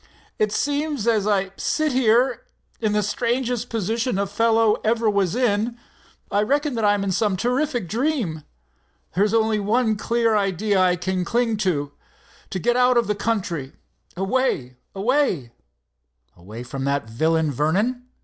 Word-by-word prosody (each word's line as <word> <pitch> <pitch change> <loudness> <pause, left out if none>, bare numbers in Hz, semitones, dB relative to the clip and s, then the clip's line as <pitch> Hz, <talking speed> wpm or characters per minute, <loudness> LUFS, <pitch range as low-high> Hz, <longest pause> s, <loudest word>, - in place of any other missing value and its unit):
"It 215 -1 +2
seems 290 0 -1
as 220 -3 +2
I 195 -2 +1
sit 310 -1 0
here, 250 0 +3 0.4
in 215 -2 0
the 210 0 +1
strangest 245 +1 -1
position 225 +1 -1
a 200 - +1
fellow 225 +1 +2
ever 225 +1 +1
was 200 -2 +1
in, 235 -1 0 0.5
I 205 - +2
reckon, 285 +6 0
that 225 -2 -2
I'm 205 -1 +3
in 195 - -1
some 200 0 +1
terrific 245 - -1
dream. 225 - -1 0.7
There's 200 +3 +2
only 220 -1 +2
one 220 +2 +1
clear 230 0 +1
idea 200 0 +1
I 180 -1 +3
can 180 +1 -2
cling 230 +3 0
to—to 165 0 -5
get 240 +6 +1
out 250 0 +4
of 235 - +3
the 210 - 0
country, 185 -10 -2 0.4
away—away——" 195 - -1 0.8
"Away 105 +7 -9
from 135 +2 -6
that 140 -4 -1
villain, 155 +6 +1
Vernon? 205 - 0
215 Hz, 140 wpm, -22 LUFS, 185-240 Hz, 0.8 s, out